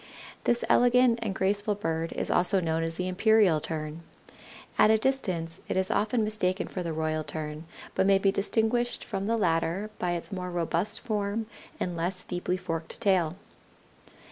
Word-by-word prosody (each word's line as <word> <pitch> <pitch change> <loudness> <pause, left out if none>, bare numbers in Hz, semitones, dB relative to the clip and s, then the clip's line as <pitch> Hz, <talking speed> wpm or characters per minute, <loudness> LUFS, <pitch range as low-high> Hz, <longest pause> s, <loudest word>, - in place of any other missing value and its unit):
This 240 0 +2
elegant 245 -1 +4
and 210 -4 -2
graceful 205 +2 +1
bird 165 -4 -2
is - - -2
also 185 +2 +3
known 165 -2 0
as 165 0 -1
the 180 +2 -2
Imperial 190 -3 +4
Tern. 155 0 -5 0.8
At - - +7
a 220 - +6
distance 185 -10 0
it - - -1
is 190 0 +1
often 220 +2 +1
mistaken 205 -3 -1
for 185 - -5
the 170 -2 -3
Royal 155 0 -1
Tern, 155 0 -5 0.3
but 190 - +2
may 195 -1 +6
be 195 0 +2
distinguished 225 +4 0
from 195 +1 -3
the 230 +1 +1
latter 180 +2 0
by 175 -1 0
its 175 +4 -4
more 180 -2 -4
robust 175 +2 -1
form 215 -1 -2 0.3
and 180 -1 -2
less 180 +2 -2
deeply 180 0 -2
forked 165 -2 -4
tail. 180 -5 +2
185 Hz, 170 wpm, -28 LUFS, 165-215 Hz, 0.8 s, At